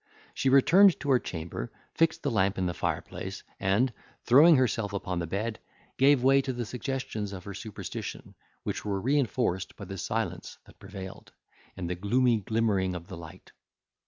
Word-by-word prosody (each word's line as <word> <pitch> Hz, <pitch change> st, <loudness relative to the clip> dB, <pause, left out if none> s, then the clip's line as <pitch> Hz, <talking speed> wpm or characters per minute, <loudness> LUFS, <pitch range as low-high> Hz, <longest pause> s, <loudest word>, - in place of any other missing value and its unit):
She 135 Hz, -, +1 dB
returned 175 Hz, +8 st, +6 dB
to 140 Hz, -, -1 dB
her 130 Hz, -, +5 dB
chamber, 80 Hz, -, -6 dB, 0.2 s
fixed 165 Hz, -1 st, +1 dB
the 140 Hz, -, 0 dB
lamp 100 Hz, -2 st, +1 dB
in 95 Hz, -, 0 dB
the 90 Hz, -, -1 dB
fireplace, -, -, -4 dB, 0.2 s
and, 110 Hz, +7 st, +2 dB, 0.3 s
throwing 155 Hz, +7 st, +7 dB
herself 115 Hz, -5 st, +1 dB
upon 90 Hz, -3 st, -2 dB
the 85 Hz, -, -3 dB
bed, 105 Hz, +6 st, -3 dB, 0.4 s
gave 135 Hz, -1 st, +4 dB
way 135 Hz, +1 st, +5 dB
to 135 Hz, -, -3 dB
the 120 Hz, -1 st, -4 dB
suggestions 120 Hz, -3 st, -4 dB
of 90 Hz, -2 st, -7 dB
her 100 Hz, -, -7 dB
superstition, 105 Hz, +1 st, -7 dB, 0.3 s
which -, -, -3 dB
were 100 Hz, -2 st, -1 dB
reinforced 120 Hz, -6 st, 0 dB
by 100 Hz, -, -8 dB
the 95 Hz, 0 st, -7 dB
silence -, -, -3 dB
that -, -, -19 dB
prevailed, 95 Hz, -2 st, -9 dB, 0.4 s
and 90 Hz, -3 st, -4 dB
the 90 Hz, -, -1 dB
gloomy 115 Hz, +6 st, +2 dB
glimmering 100 Hz, -3 st, 0 dB
of 85 Hz, +2 st, -8 dB
the 95 Hz, -, -6 dB
light. 80 Hz, -2 st, -12 dB
110 Hz, 170 wpm, -28 LUFS, 95-130 Hz, 0.4 s, throwing